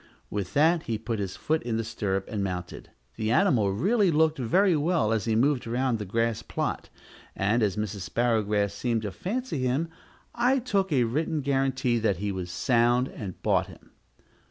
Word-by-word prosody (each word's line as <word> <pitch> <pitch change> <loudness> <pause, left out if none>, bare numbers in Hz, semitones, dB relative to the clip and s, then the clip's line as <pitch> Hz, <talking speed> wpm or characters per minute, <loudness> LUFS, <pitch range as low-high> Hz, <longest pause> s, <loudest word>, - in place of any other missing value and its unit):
With 100 -2 -4
that 160 +3 +4
he 110 - 0
put 115 0 -4
his 95 -2 -3
foot 155 +11 -1
in 115 -2 -2
the 115 - -1
stirrup, 100 -3 -2
and 105 -2 -3
mounted. 90 -3 -5 0.3
The 110 -1 -1
animal 120 - +3
really 195 - +2
looked 160 -1 +2
very 180 - +3
well 150 -7 +1
as 110 -4 -1
he 110 - +1
moved 130 +1 +2
around 120 0 0
the 105 - -4
grass 115 +3 0
plot, - - -3 0.5
and, 105 +5 +1
as 105 -4 +1
Mrs. 105 -3 -4
Sparrowgrass 105 -4 +1
seemed 115 +1 -1
to 105 - -3
fancy 210 - -3
him, 130 +6 0 0.4
I 245 +3 +2
took 200 -7 0
a 130 -4 +3
written 150 +6 -1
guarantee 135 -3 +1
that 105 -5 +1
he 100 +2 -2
was 90 -2 -5
sound, 120 +6 +2
and 95 -5 -7
bought - - +2
him. - - -16
115 Hz, 180 wpm, -27 LUFS, 105-150 Hz, 0.5 s, that